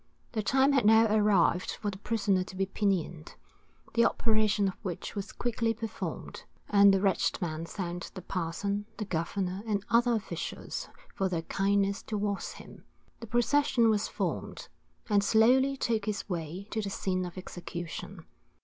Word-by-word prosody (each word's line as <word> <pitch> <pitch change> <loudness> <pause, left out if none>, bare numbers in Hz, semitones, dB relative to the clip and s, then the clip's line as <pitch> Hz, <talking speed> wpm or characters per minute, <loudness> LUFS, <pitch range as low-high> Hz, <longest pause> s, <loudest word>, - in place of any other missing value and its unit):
The 220 - -1
time 265 +6 +3
had 270 -4 +3
now 220 +2 +6
arrived 200 -4 +3
for 205 - -2
the 190 - -9
prisoner 200 -4 +1
to 190 - -10
be 195 +1 +1
pinioned, 185 -5 -2 0.6
the 235 - +4
operation 215 -3 +2
of 190 - -1
which 180 -5 -5
was 200 -2 -5
quickly 230 -1 -1
performed, 225 0 -5 0.3
and 200 -1 +7
the 195 - +3
wretched 195 -1 +1
man 165 -2 -3
thanked 175 -2 -5
the 185 - -7
parson, 200 +4 -2
the 215 - -3
governor, 185 +2 -2
and 205 -2 -1
other 240 +1 +4
officials 220 - -5 0.2
for 190 -1 0
their 165 -2 -2
kindness 200 +2 +1
towards 205 -2 -2
him. - - -13 0.4
The 230 - -8
procession 240 0 +3
was 210 0 +1
formed, - - -4 0.4
and 205 -3 +3
slowly 255 +6 +4
took 225 -5 0
its 210 -1 -2
way 175 +1 -4
to 220 - -1
the 200 - -3
scene 185 -1 -1
of 180 +1 -7
execution. 175 -2 -7
200 Hz, 160 wpm, -30 LUFS, 185-220 Hz, 0.6 s, and